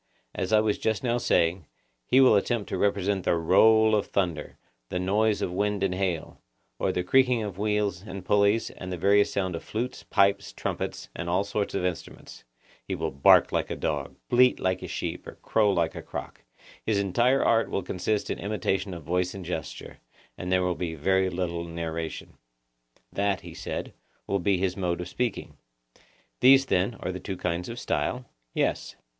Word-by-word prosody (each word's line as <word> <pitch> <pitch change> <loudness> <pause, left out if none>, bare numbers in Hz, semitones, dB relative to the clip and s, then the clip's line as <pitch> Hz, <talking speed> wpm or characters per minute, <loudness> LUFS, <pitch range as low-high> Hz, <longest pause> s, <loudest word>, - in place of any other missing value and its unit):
As 95 - -3
I 110 -1 +5
was 110 -1 0
just 110 0 -1
now 120 -1 +1
saying, 85 -7 +1 0.4
he 130 - +5
will 130 -5 +7
attempt 105 +1 0
to - - -2
represent 100 -1 +1
the - - +2
roll 110 +6 +5
of 105 -2 +1
thunder, 85 -6 -2 0.3
the 90 - -2
noise 105 +4 +1
of - - -2
wind 100 +1 -1
and 95 -2 +1
hail, 90 -4 -3 0.4
or - - +1
the 90 - -1
creaking 125 +3 +3
of 100 -3 -6
wheels, 105 -3 0
and 95 -2 -8
pulleys, 105 +3 +2
and 90 - -8
the 90 - -3
various 100 +4 +3
sounds 95 -3 -1
of 85 - -6
flutes, 120 +4 -4
pipes, 100 0 +1
trumpets, - - -4
and 85 - -4
all 90 +3 +2
sorts 100 0 -3
of 95 -2 -1
instruments: 90 -2 -6 0.4
he - - -4
will - - -3
bark 70 0 +5
like - - -1
a - - -3
dog, - - -3
bleat 125 +1 +4
like 95 -1 0
a - - -6
sheep, - - -5
or - - -9
crow 105 -2 +3
like 85 -3 0
a - - -7
cock; - - -8 0.4
his 110 -2 +1
entire 120 +7 +2
art 115 0 +3
will 100 - -2
consist 100 +4 -2
in - - -3
imitation 100 -2 -2
of 85 - -9
voice 90 +4 -1
and 95 -2 -7
gesture, 80 -2 -6 0.4
and 90 +1 -5
there 95 0 +3
will 90 0 +1
be 85 -2 -4
very 95 +5 +2
little 85 -2 -3
narration. 85 -1 -5 0.8
That, 100 -1 0
he - - -10
said, - - -5 0.3
will 100 - 0
be 95 +1 +2
his 90 0 -1
mode 90 -3 -1
of 90 - -5
speaking. 120 +4 -3 0.8
These, 135 +1 +7
then, 95 +1 +1
are - - -2
the 90 - -6
two 95 -1 -5
kinds 90 +2 -2
of 115 - -6
style? 125 0 -2 0.3
Yes. - - -1
95 Hz, 190 wpm, -27 LUFS, 90-105 Hz, 0.8 s, will